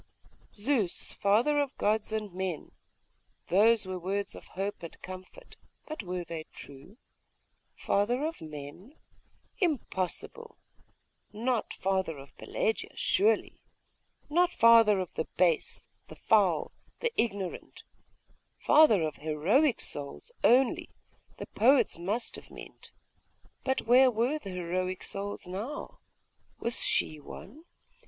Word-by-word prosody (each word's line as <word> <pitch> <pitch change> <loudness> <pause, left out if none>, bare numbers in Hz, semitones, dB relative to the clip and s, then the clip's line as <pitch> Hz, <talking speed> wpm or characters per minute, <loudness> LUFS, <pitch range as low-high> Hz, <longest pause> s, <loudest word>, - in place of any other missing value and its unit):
'Zeus, 215 -4 -1
father 235 +9 +2
of 285 -1 -2
gods 215 +1 0
and 215 -3 -3
men.'.... 185 -3 -4 0.8
Those 215 +3 +4
were 185 -1 -4
words 195 +3 -2
of - - -11
hope 200 +2 -3
and 170 - -9
comfort.... 185 - -11 0.3
But 310 -4 -5
were 180 -2 -4
they 165 -1 -7
true? 140 - -13 0.8
Father 240 +8 0
of 325 +1 -4
men? 155 - -9 0.6
Impossible! 345 - -2 0.7
not 235 +2 -1
father 190 -5 -1
of 135 0 -13
Pelagia, - - -2
surely. 425 +4 +1 0.7
Not 350 +4 +3
father 230 - +6
of 185 -2 -4
the 160 - -2
base, 170 -4 +1 0.2
the - - -11
foul, - - +2 0.3
the 475 - 0
ignorant.... 200 -5 -3 0.7
Father 295 - +5
of 155 - -3
heroic 190 - +2
souls, 145 - -6
only, 255 +1 +4 0.5
the - - -6
poets 255 -5 +3
must 205 +7 -2
have - - -13
meant.... - - -12 0.7
But 265 0 0
where 255 +3 +6
were 245 +6 0
the 200 - -8
heroic 185 +1 -3
souls 200 0 -5
now? 205 +11 -6 0.6
Was 235 - 0
she 155 - +2
one? 265 - -11
205 Hz, 120 wpm, -29 LUFS, 180-260 Hz, 0.8 s, father